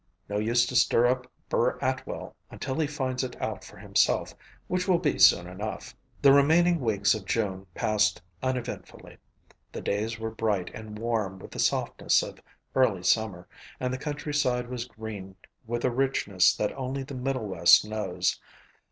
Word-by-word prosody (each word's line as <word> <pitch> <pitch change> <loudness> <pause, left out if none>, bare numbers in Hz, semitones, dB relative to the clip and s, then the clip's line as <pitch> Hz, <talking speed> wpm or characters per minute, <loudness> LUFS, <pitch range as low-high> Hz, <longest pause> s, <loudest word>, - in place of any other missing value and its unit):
No 105 0 -2
use 120 +3 +3
to 125 - -5
stir 120 -1 +4
up 125 +1 0 0.2
Burr - - +1
Atwell - - -3
until 130 +3 -4
he 155 - +2
finds 130 -3 -2
it 125 -1 -6
out - - -3
for - - -13
himself, - - +1 0.3
which 180 +1 -1
will 185 -2 +4
be 160 -4 0
soon 90 - +7
enough." 100 +4 -6 0.3
The 140 -1 +8
remaining 165 +5 +4
weeks 105 -6 +2
of 110 - -4
June 95 -3 -1
passed 105 0 +1 0.2
uneventfully. 130 -2 -5 0.5
The - - -6
days 110 +3 -2
were 110 0 -4
bright 105 -5 -1
and 110 -1 -8
warm 110 -4 -1
with - - -12
the - - -7
softness - - +2
of - - -9 0.3
early 115 -9 +2
summer 95 -2 +1 0.3
and 125 0 -1
the 130 - -3
countryside 145 -4 -1
was 125 -2 -4
green 105 -5 -8 0.3
with 120 +1 -2
a 130 - +2
richness 120 -7 +2
that 105 - -2
only 135 +1 -3
the 140 +1 -9
middle 130 -2 -2
west 90 0 +6
knows. 95 -4 -1
115 Hz, 165 wpm, -27 LUFS, 105-130 Hz, 0.5 s, The